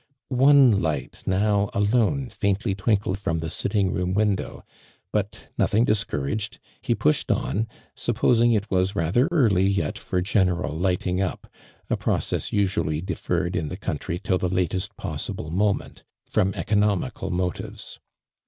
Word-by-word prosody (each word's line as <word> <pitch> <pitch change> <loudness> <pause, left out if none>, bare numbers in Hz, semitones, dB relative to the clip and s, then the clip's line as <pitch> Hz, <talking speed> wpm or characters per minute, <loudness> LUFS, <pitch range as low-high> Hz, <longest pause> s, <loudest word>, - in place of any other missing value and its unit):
One 130 -5 +6
light 80 -2 -3
now 100 +1 +2
alone 120 +6 +2
faintly 100 0 0
twinkled 100 -1 0
from 95 -4 -1
the 80 -1 -3
sitting 100 -3 0
room 90 0 -1
window, 105 -2 -1 0.5
but, - - -3
nothing 110 +3 +3
dis 105 -3 +2
couraged, 70 +10 -3 0.2
he - - 0
pushed 75 - +1
on, 110 +3 0 0.3
supposing 120 0 +2
it 105 -2 0
was 95 +1 +1
rather 100 - +2
early 110 - +3
yet 95 -6 -1
for 90 - -2
general 90 -6 +1
"lighting 90 +1 0
up," 95 - -3 0.4
a - - 0
process - - -1
usually 90 -6 0
deferred 90 0 -2
in 80 -3 -1
me 95 - -5
countiy 85 -2 -4
till 90 -1 +1
the 90 - 0
latest 90 0 -1
possible 80 - -4
moment, 100 +3 0 0.3
from 95 +1 +1
econo 105 0 +2
mical 100 -5 -5
motives. 90 0 -4
95 Hz, 145 wpm, -24 LUFS, 90-105 Hz, 0.5 s, One